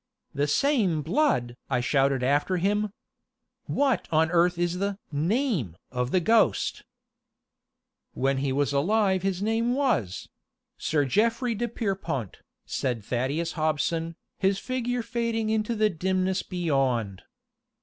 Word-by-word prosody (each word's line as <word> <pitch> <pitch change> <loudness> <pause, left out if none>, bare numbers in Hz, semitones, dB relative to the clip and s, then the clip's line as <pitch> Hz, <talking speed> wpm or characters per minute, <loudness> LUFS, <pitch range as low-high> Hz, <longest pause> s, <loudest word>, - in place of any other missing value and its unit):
"The 145 +1 0
same 190 - +2
blood!" 155 - +1
I 130 -2 +1
shouted 135 +1 +2
after 145 +8 +2
him. 205 +3 0 0.8
"What 270 -8 +1
on 160 +1 +3
earth 175 0 +3
is 175 +1 -1
the 200 0 -1
name 165 - 0
of 125 -1 -1
the 185 - +3
ghost?" 215 - +2 1.3
"When 135 +1 +1
he 135 0 -1
was 145 +1 0
alive 190 +5 +2
his 190 0 -1
name 230 +3 +1
was 215 - 0 0.5
Sir 150 -2 +1
Geoffray 230 - +1
de 240 +2 -2
Pierrepont," 190 - -3 0.3
said 120 -5 -2
Thaddeus 140 +8 -1
Hobson, 160 +1 -1 0.2
his 195 0 +2
figure 245 +1 -2
fading 230 -2 -1
into 220 +1 0
the 215 -1 +2
dimness 185 +2 0
beyond. 135 - -1
180 Hz, 125 wpm, -26 LUFS, 140-220 Hz, 1.3 s, on